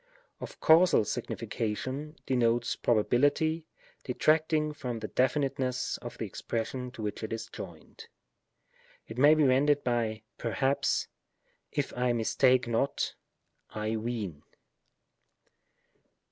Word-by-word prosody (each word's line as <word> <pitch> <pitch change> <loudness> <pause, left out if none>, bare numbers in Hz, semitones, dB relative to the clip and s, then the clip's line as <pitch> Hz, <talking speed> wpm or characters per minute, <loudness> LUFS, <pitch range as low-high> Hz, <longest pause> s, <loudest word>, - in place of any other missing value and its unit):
Of - - -8
causal 165 -7 +5
signification, 130 +11 -3
denotes 120 -2 +1
probability, 145 +8 +2 0.4
detracting 155 +3 +2
from 125 -5 -4
the 110 -1 -5
definiteness 130 -1 0
of - - -8
the - - -3
expression 125 +2 -4
to 110 - -7
which 105 -1 -3
it 110 - -5
is 115 0 -3
joined. - - -10 1.0
It 110 +3 -7
may 145 +3 +7
be 155 - +3
rendered 140 +2 +3
by 115 -3 -1
" - - -52
perhaps," 135 +4 0 0.3
" - - -50 0.3
if - - -2
I 125 0 +1
mistake 125 +2 +3
not," 120 +4 0 0.3
" - - -50 0.2
I 110 +1 -2
ween." 110 -9 -4
125 Hz, 120 wpm, -30 LUFS, 115-145 Hz, 1.0 s, may